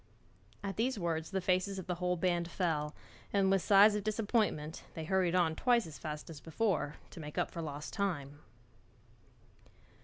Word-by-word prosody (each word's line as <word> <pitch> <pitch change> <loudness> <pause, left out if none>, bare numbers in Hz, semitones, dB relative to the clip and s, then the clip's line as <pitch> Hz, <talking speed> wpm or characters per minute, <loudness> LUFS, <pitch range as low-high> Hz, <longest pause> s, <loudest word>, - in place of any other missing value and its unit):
At 195 -1 -4
these 245 +2 +1
words 165 -3 -1
the 190 -1 -1
faces 185 +2 +1
of 190 - -5
the 180 - -1
whole 180 0 +1
band 175 -1 +1
fell, 155 -4 -1 0.4
and 195 -1 +3
with 195 -1 +3
sighs 205 +4 +7
of 210 -1 -1
disappointment 210 -7 0
they 160 - -4
hurried 185 0 +2
on 165 -3 +3
twice 240 +4 +3
as 160 -2 -9
fast 150 -1 -5
as 160 -3 -8
before, 160 -2 -1 0.2
to - - -10
make 150 -1 -8
up - - 0
for 170 - -5
lost 150 -2 -6
time. 145 -8 -2
180 Hz, 175 wpm, -33 LUFS, 160-200 Hz, 0.4 s, sighs